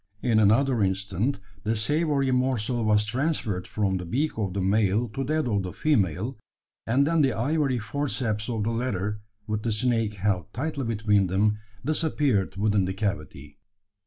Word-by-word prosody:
In 115 -3 +3
another 115 +4 +3
instant 100 +5 0 0.3
the 110 +1 0
savoury 140 +3 +1
morsel 125 -2 0
was 105 -1 +3
transferred 115 - -1
from 100 -3 0
the 90 - -5
beak 145 - 0
of 100 -4 -2
the - - 0
male 100 +4 +2
to 135 +5 -3
that 155 0 0
of 105 -4 +1
the 90 -1 -5
female; 110 - 0 0.5
and 130 +5 +3
then 165 +1 +2
the 135 -4 +3
ivory 135 +4 +1
forceps 115 -3 -2
of 110 -3 -1
the 115 - 0
latter, 105 -3 -2 0.2
with 105 0 -2
the 115 - -1
snake 115 -1 0
held 100 -2 -1
tightly 140 +1 -3
between 105 -3 +2
them, 105 +3 +1 0.3
disappeared 145 - +1
within 100 -1 +2
the 95 +1 -3
cavity. 100 -9 -4
110 Hz, 160 wpm, -26 LUFS, 100-130 Hz, 0.5 s, In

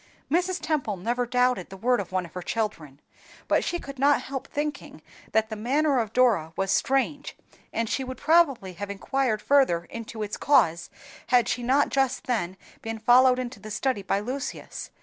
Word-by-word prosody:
Mrs. 360 +3 +1
Temple 280 -10 -1
never 240 +6 -1
doubted 250 -5 +1
the 195 - -9
word 245 +4 +2
of 190 -3 -5
one 185 -1 -1
of 170 - -14
her 180 - -5
children, 175 -9 -3 0.5
but - - +2
she 350 - -1
could 275 -5 -9
not 285 +1 +4
help 270 -1 -5
thinking 295 0 -5 0.3
that 220 0 +2
the 220 - -4
manner 270 +5 +1
of 220 -3 -2
Dora 220 -11 +2
was 195 0 -1
strange, 270 +6 0 0.3
and 230 0 -1
she 265 - -1
would 260 0 -6
probably 285 - +3
have 200 +4 -6
inquired 220 +2 -1
further 265 -12 +3
into 230 -1 -6
its 210 0 -4
cause, 170 - +3 0.4
had 245 -2 +4
she 245 - -1
not 265 +4 +2
just 270 -2 0
then 190 -7 -2 0.2
been 225 0 -4
followed 250 +3 +5
into 255 0 -5
the 215 - -9
study 255 0 -1
by 195 +1 0
Lucius. 255 +6 -5
245 Hz, 185 wpm, -26 LUFS, 205-270 Hz, 0.5 s, followed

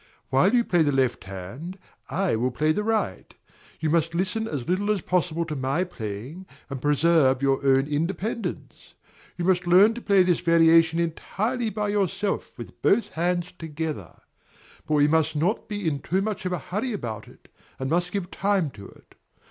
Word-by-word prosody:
While 140 - +4
you 240 - +4
play 175 -6 +2
the 145 -2 +3
left 130 -7 0
hand, 100 - -8 0.3
I 190 -8 0
will 120 +3 0
play 155 +5 +1
the 210 +7 -1
right: 215 - -2 0.4
you 155 -1 0
must 165 0 +1
listen 220 +5 -1
as 140 - -4
little 190 +4 0
as 210 -3 +1
possible 170 -2 0
to 155 -2 -5
my 135 +6 0
playing, 130 - -7 0.2
and 135 -2 -5
preserve 145 -2 +3
your 135 0 +2
own 135 0 +4
independence. 175 +10 -4 0.4
You 175 - -2
must 180 -1 +2
learn 195 +6 +6
to 240 - -7
play 200 -4 +4
this 180 -2 +2
variation 165 -1 +4
entirely 215 +8 -2
by 210 0 -2
yourself 205 0 -1
with 120 - -10
both 225 +3 +3
hands 175 +1 -1
together; 160 - -6 0.7
but 155 - +1
we 145 0 +4
must 160 0 +2
not 175 +11 -1
be 205 -4 -3
too 185 +7 -1
much 210 -2 -3
in 180 - -2
a - - 0
hurry 220 +9 -3
about 115 - -5
it, - - -18 0.3
and 130 - -3
must 175 +4 0
give 195 -2 -3
time 195 -7 0
to 100 -4 -11
it. - - -19
170 Hz, 180 wpm, -25 LUFS, 145-195 Hz, 0.7 s, learn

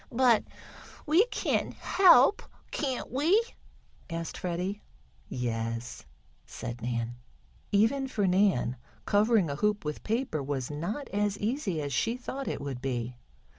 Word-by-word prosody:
"But 240 -2 +4 0.6
we 340 +9 +4
can - - -1
help, 360 -3 +5 0.3
can't 265 -4 -2
we?" 315 - +4 0.7
asked 165 0 -4
Freddie. 180 +3 -3 0.5
"Yes," 115 -1 -3 0.4
said 120 0 -7
Nan. 120 0 -2 0.5
Even 225 +7 +3
for 210 -6 0
Nan 180 - +2 0.3
covering 210 -2 +3
a 140 -1 -3
hoop 210 0 0
with 150 0 -3
paper 225 - -1
was 135 -1 -3
not 175 - -4
as 205 0 0
easy 210 - -1
as 140 -1 -3
she 230 - 0
thought 265 +2 -5
it - - -3
would 135 -3 -5
be. 125 -2 -3
195 Hz, 130 wpm, -29 LUFS, -, 0.7 s, help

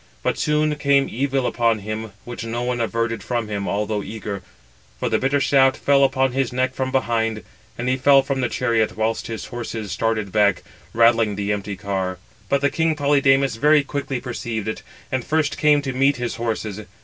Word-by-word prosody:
But - - 0
soon 150 0 +1
came 140 -1 +3
evil 135 +1 0
upon 115 -2 +1
him, 110 +1 -5
which 120 -1 -6
no 115 +1 -3
one 125 -1 -1
averted 115 -1 -1
from 120 +1 -2
him, 100 -1 -3
although 105 +1 -1
eager; 105 -2 -6 0.6
for - - -1
the - - +1
bitter 135 +2 +1
shaft 135 -1 +4
fell 140 -1 +3
upon 135 -1 +2
his 135 0 -1
neck 130 +1 0
from 130 0 -2
behind, 115 -4 0 0.3
and 120 - -3
he 130 +1 +2
fell 135 +1 +5
from 135 -2 -2
the 125 - 0
chariot, 115 -4 0
whilst 110 +1 -1
his 115 -2 -5
horses 115 -4 -5
started 110 -3 -1
back, 100 -2 +2 0.3
rattling 115 -2 +3
the 100 +1 -1
empty 100 0 -4
car. 95 -2 -3 0.3
But 140 0 +2
king 160 -1 +1
Polydamas 140 -3 +3
very 150 +3 +4
quickly 140 -2 -3
perceived 115 -4 -4
it, 110 - -3 0.3
and 130 -1 -1
first 155 0 0
came 150 -2 +4
to 135 -1 -3
meet 135 +2 +3
his 120 -1 -4
horses. 110 -3 -3
120 Hz, 185 wpm, -22 LUFS, 110-135 Hz, 0.6 s, fell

